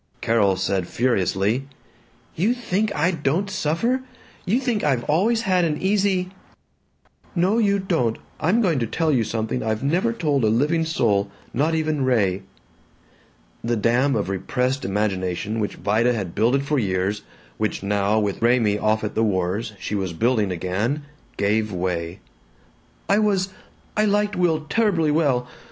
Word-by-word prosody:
Carol 105 -4 +2
said 95 -1 -1
furiously, 115 +1 0 0.7
"You 210 +9 +1
think 215 -3 -1
I 165 +4 +2
don't 165 +4 -1
suffer? 190 - 0 0.5
You 220 +7 +2
think 245 -5 -1
I've 135 -5 +1
always 215 - +2
had 185 -4 +2
an 155 -2 0
easy 190 -2 +1 0.5
" - - -35
"No, 210 +5 +2
you 200 -3 +3
don't. 165 - 0 0.2
I'm 210 +9 +2
going 165 -8 +2
to 115 - -1
tell 160 +6 0
you 125 -5 +2
something 110 +2 -2
I've 110 +2 -2
never 175 +11 +1
told 150 - 0
a - - +4
living 150 +9 +2
soul, 105 -10 +1 0.2
not 155 +6 +1
even 155 -3 0
Ray." 100 -7 +1 1.2
The 120 +1 0
dam 120 +5 +2
of 105 -4 -1
repressed 125 +8 -1
imagination 95 +1 -1
which 105 - -2
Vida 115 +4 +1
had 95 -7 -4
builded 125 +6 +2
for 145 -1 +1
years, 100 0 -1 0.4
which - - -1
now, 100 +1 +1
with 100 -2 -2
Raymie 115 -3 +3
off 110 0 +1
at 105 - -3
the - - 0
wars, 100 +2 -1
she - - -5
was 95 -4 -2
building 110 +1 +1
again, 100 - -2 0.3
gave 105 +2 +1
way. 90 -2 -3 0.9
"I 200 +1 +3
was 195 -3 +1 0.5
I 215 - +3
liked 205 0 +1
Will 170 -3 +2
terribly 165 -2 +1
well. 140 -6 +1
125 Hz, 155 wpm, -23 LUFS, 105-175 Hz, 1.2 s, a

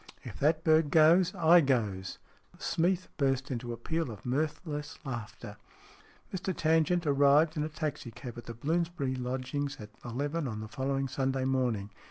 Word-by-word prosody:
"If - - -9
that 155 +2 +2
bird 155 -1 +4
goes, 165 +5 +5
I 170 0 +6
goes!" 105 - -1 0.4
Smeath 180 +2 0
burst 135 -1 0
into 120 -1 -3
a 120 - -5
peal 160 +4 -2
of 105 -5 -10
mirthless 150 +3 -2
laughter. 120 -5 -6 0.8
Mr 190 -1 -3
Tangent 165 +2 +2
arrived 145 +3 +4
in 150 - -1
a 155 - -1
taxi 150 -5 -4
cab 120 +1 -9
at - - -11
the 115 - -6
Blooms 165 +8 0
bury 140 -7 -2
lodgings 130 +3 -3
at 105 0 -9
eleven 145 +6 -2
on 110 -3 -4
the 110 - -6
following 135 +4 -1
Sunday 135 0 -1
morning. 120 -6 0
140 Hz, 165 wpm, -30 LUFS, 125-160 Hz, 0.8 s, I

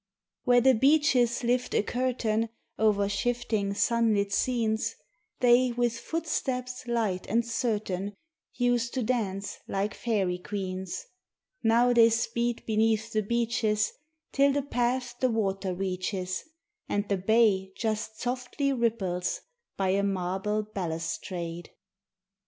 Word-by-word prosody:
Where 245 -1 +5
the 265 +2 +6
beeches 260 -2 +3
lift 245 +1 0
a - - +3
curtain 230 -2 0 0.3
Over 210 -2 +3
shifting 205 -1 -1
sunlit 215 -3 +2
scenes, 225 -1 0 0.5
They 245 0 +5
with 240 -1 0
footsteps 255 -6 -3
light 220 -6 -1
and 230 +2 +1
certain 210 -4 -2 0.4
Used 245 -1 +1
to 255 - 0
dance 205 -5 -2
like 200 +2 -1
fairy 195 -6 -1
queens; 185 -2 -4 0.6
Now 235 +2 +4
they 230 -1 +7
speed 235 +1 -1
beneath 220 0 +1
the 215 - +2
beeches 220 -1 0 0.4
Till 280 0 +4
the 285 0 0
path 245 -1 -1
the 255 - +2
water 195 -4 -1
reaches 185 0 -3 0.4
And 205 0 0
the 200 - +1
bay 195 -1 +3
just 220 -1 -2
softly 250 +3 -1
ripples 215 -8 -1 0.4
by 195 -1 +1
a 195 +1 +2
marble 195 +2 -1
balustrade. 170 -2 -4
220 Hz, 115 wpm, -28 LUFS, 195-245 Hz, 0.6 s, they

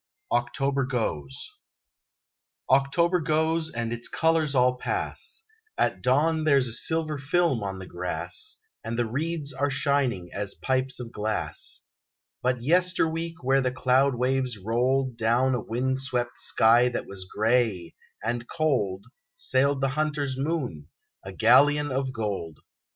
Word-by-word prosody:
OCTOBER 140 -1 0
GOES 75 - -3 1.2
October 170 +7 +3
goes, 160 +1 +1
and 115 -3 -3
its 120 0 -5
colors 160 -3 +1
all 125 0 +4
pass: 445 - -3 0.3
At - - +1
dawn 155 +5 +2
there's 140 -4 +4
a 115 - -2
silver 155 +3 -1
film 145 -3 +1
on 95 -1 -4
the 95 - -8
grass, 90 - -3 0.2
And 115 0 -4
the 120 - +1
reeds 145 +4 -2
are 140 +1 0
shining 135 - 0
as 100 -1 -4
pipes 130 0 -1
of 120 -2 -7
glass, 110 0 -3 0.6
But 125 -1 0
yesterweek 165 0 +1
where 135 +1 +3
the 130 -1 0
cloud 130 +1 +2
waves 130 -1 0
rolled 125 +5 0
Down 120 +4 +2
a 125 - 0
wind 130 +4 -1
swept 125 -2 -2
sky 120 +2 +4
that 120 - -4
was 95 -1 -8
grey, 110 -4 0 0.3
and 120 +1 -2
cold, 125 - 0 0.3
Sailed 140 - +1
the 135 - +2
hunter's 145 -1 -1
moon, 135 - -3 0.4
a 95 - -7
galleon 140 +8 +4
of 130 0 -1
gold! 100 - -4
130 Hz, 135 wpm, -26 LUFS, 115-145 Hz, 1.2 s, all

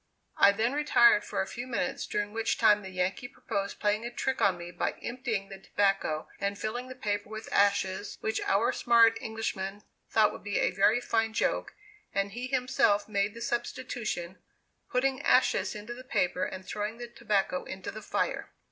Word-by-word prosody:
I 200 - +7
then 225 +5 0
retired 235 -7 +5
for - - -1
a - - -6
few 240 +5 -6
minutes, 245 - -2
during 205 0 -2
which 225 0 0
time 210 -1 +5
the 190 - -8
Yankee 185 +6 -2
proposed 200 -6 -4
playing 210 +1 +1
a 240 - -3
trick 260 +2 -2
on 190 -3 +3
me 175 0 -8
by - - -1
emptying 235 -5 -3
the 195 -1 -9
tobacco, 195 -6 0
and 200 0 -1
filling 240 +5 -4
the 255 - -8
paper 205 -4 -2
with 220 0 -7
ashes, 200 0 +1
which 220 0 -1
our 205 +4 +2
smart 230 -1 +4
Englishman 205 -2 -4 0.3
thought 215 -1 +4
would - - -10
be 205 0 -1
a - - +2
very 210 +6 +3
fine 225 -2 0
joke, - - -1 0.4
and 200 0 0
he 245 +4 -5
himself 250 -5 +2
made 200 0 0
the 235 - -8
substitution, 235 -6 -3 0.5
putting 260 +1 +1
ashes 235 -9 +3
into 210 +3 -6
the 250 +1 -10
paper 180 -6 0
and 190 0 -7
throwing 210 +4 -4
the 240 0 -6
tobacco 210 -6 -1
into 190 -1 -6
the 215 - -8
fire. - - -2
215 Hz, 185 wpm, -29 LUFS, 200-240 Hz, 0.5 s, I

